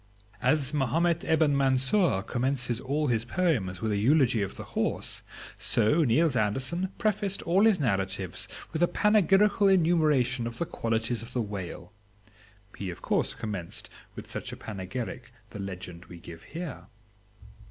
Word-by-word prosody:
As 145 -2 +2
Mahomet 165 +5 +1
Ebn 160 -3 +3
Mansour 135 - +2
commences 125 0 -1
all 145 +4 -1
his 115 -5 +1
poems 120 - 0
with 110 - 0
a 105 - +1
eulogy 125 0 +3
of 100 - -3
the - - -7
horse, - - -2 0.4
so 150 +10 +3
Niels 145 +3 +3
Andersen 135 - 0
prefaced 205 -2 0
all 190 +5 +3
his 220 -5 +4
narratives 95 - -1 0.3
with 160 - -2
a 175 - +5
panegyrical 205 +1 +4
enumeration 155 -9 +3
of 115 0 -6
the 170 - -1
qualities 115 -3 -1
of 115 - -9
the 125 - 0
whale. 100 -1 -7 0.8
He 100 - -5
of 85 - -8
course - - 0
commenced 100 -6 -6 0.2
with - - -8
such - - -5
a - - -7
panegyric 110 +4 -6 0.2
the 105 - -8
legend 90 -3 -7
we 85 0 -11
give 85 -1 -11
here. 165 - -7
130 Hz, 150 wpm, -28 LUFS, 105-165 Hz, 0.8 s, a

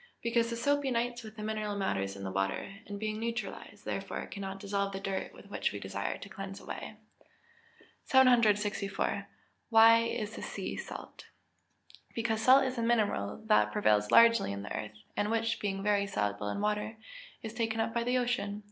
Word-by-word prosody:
_ - - -26 0.2
Because 235 0 +2
the 235 - -2
soap 285 +4 +1
unites 240 -2 -1
with 220 -1 -10
the 215 - -7
mineral 215 -1 -2
matters 100 - -1
in 100 - -8
the 95 - -3
water, 95 - -2
and 205 -1 -6
being 215 0 -2
neutralised 230 +1 -5
thereby, - - -3
cannot 195 -1 -6
dissolve 200 0 -1
the 195 - -3
dirt 195 -1 -3 0.2
which 200 - -1
we 100 - -5
desire 100 +1 -3
to - - -9
cleanse 195 0 -7
away. - - -7 1.1
764. 210 -6 +3 0.4
Why 225 0 +8
is 225 -2 -2
the - - -7
sea - - -4
salt? - - -8 0.9
Because 225 -1 0
salt 260 +4 +7
is 260 -2 -2
a - - +1
mineral 210 - 0
which 105 0 +4
prevails 105 0 +2
largely 230 - +6
in 100 0 -5
the 105 - -5
earth, 105 0 -5 0.2
and 205 0 0
which, 225 0 0
being 195 -1 -2
very 200 -1 +2
soluble 105 - -1
in 150 - -3
water, 210 +1 -1 0.5
is 220 -1 -5
taken 225 -1 -1
up 225 0 0
by 235 0 0
the 250 +1 +1
ocean. 235 -5 -1
210 Hz, 180 wpm, -31 LUFS, 195-230 Hz, 1.1 s, Why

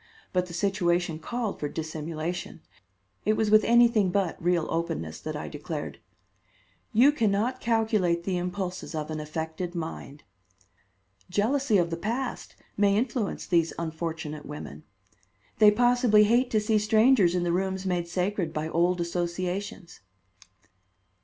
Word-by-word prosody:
But 180 -1 +1
the 170 - -10
situation 175 -3 0
called 230 +4 -3
for 145 - -2
dissimulation. 160 +2 -5 0.6
It 215 - +2
was 215 -1 0
with 215 0 +7
anything 235 -4 +4
but 180 -3 -1
real 175 -2 +2
openness 80 - -3
that - - -5
I - - -5
declared: - - -6 0.9
"You 255 +6 +6
can 230 -8 +1
not 230 +6 -1
calculate 215 -7 +1
the 185 +1 -1
impulses 180 -1 -4
of 155 0 -4
an 155 - -3
affected 160 +3 -5
mind. 160 -3 -6 1.1
Jealousy 220 +5 +2
of 170 -2 +1
the 165 - -2
past 235 +8 -4 0.2
may 200 0 +3
influence 230 -2 -2
these 165 -2 +1
unfortunate 160 -2 -5
women. 150 +1 -8 0.8
They 210 -1 +8
possibly 240 -1 +4
hate 240 +4 +3
to 215 - +2
see 215 0 +2
strangers 215 -3 +4
in 180 - +1
the 170 -1 0
rooms 190 +1 -1
made 175 -2 -1
sacred 180 -1 -1
by 155 +1 -3
old 175 +2 +1
associations." 180 +2 -3
180 Hz, 140 wpm, -27 LUFS, 170-215 Hz, 1.1 s, They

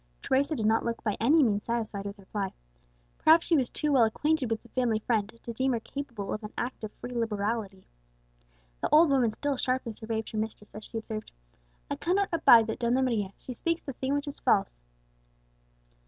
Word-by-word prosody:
Teresa 280 +4 +1
did 220 - -2
not 220 +1 +3
look 230 -1 -3
by 210 -3 0
any 295 +7 +5
means 205 -4 0
satisfied 220 -4 -2
with 200 0 -5
the 200 - -17
reply; 195 0 -3 0.7
perhaps 325 +1 +6
she 335 - +3
was 260 -5 +2
too 300 - -1
well 260 -4 +5
acquainted 285 +4 +1
with 225 -1 -2
the 235 - -17
family 240 -3 +1
friend 215 -1 0
to 235 - -4
deem 260 +3 +1
her 235 - 0
capable 235 -5 -5
of 215 - -5
an 210 - -6
act 245 -1 -4
of 215 - -4
free 245 - -8
liberality. 210 -3 -2 1.0
The - - 0
old 310 0 +6
woman 250 -5 +3
still 285 +4 -2
sharply 255 -2 -1
surveyed 220 0 -4
her 215 - -3
mistress 215 -1 -5
as 210 0 -8
she 230 - -6
observed, 220 -1 -5 0.6
"I - - -1
cannot 390 +3 +1
abide 240 -8 +7
that 220 +3 -4
Donna 245 +2 +2
Maria; 210 -6 -1
she 255 - -8
speaks 335 +7 -1
the 275 - -5
thing 265 +3 -1
which 285 +1 -2
is 285 - -5
false." - - +1
235 Hz, 205 wpm, -29 LUFS, 215-270 Hz, 1.0 s, abide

